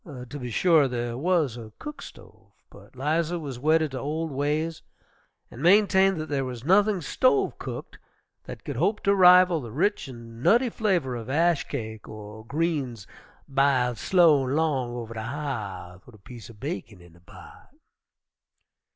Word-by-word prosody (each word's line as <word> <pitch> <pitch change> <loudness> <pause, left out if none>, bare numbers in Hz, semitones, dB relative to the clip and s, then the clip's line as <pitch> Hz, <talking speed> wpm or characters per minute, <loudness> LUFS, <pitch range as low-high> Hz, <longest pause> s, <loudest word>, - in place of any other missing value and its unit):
To 135 -3 -9
be 125 -2 -5
sure, 160 +3 +4
there 120 -1 -3
was 155 -3 +1
a 110 -2 -10
cook 300 0 -8
stove, - - -14 0.2
but - - -17
'Liza 160 +5 0
was 140 -7 -6
wedded 155 +2 +2
to 130 - -5
old 155 +3 -3
ways 150 +4 -2 0.7
and 125 - -10
maintained 195 0 +4
there 145 -3 -2
was 125 -2 -6
nothing 200 +2 +3
"stove 260 - +1
cooked" - - -7 0.5
that - - -10
could - - -5
hope 210 +1 +1
to 200 - +3
rival 180 -3 +6
the 120 -3 -8
rich 170 - 0
and 115 -2 -11
nutty 240 - +3
flavor 180 - 0
of 115 0 -7
ash 165 +2 +1
cake, 110 -5 -6
or 110 0 -10
greens 140 - -2 0.4
"b'iled 135 -4 +1
slow 165 -7 +4
an' 130 +2 -2
long 135 -7 0
over 115 -1 -6
de 110 - -5
ha'th, 105 -9 -6
wid 125 - -15
a - - -16
piece 115 +3 -12
er - - -11
bacon 115 - -6
in 85 -1 -17
de 85 - -20
pot." 85 - -15
140 Hz, 165 wpm, -26 LUFS, 120-170 Hz, 0.7 s, rival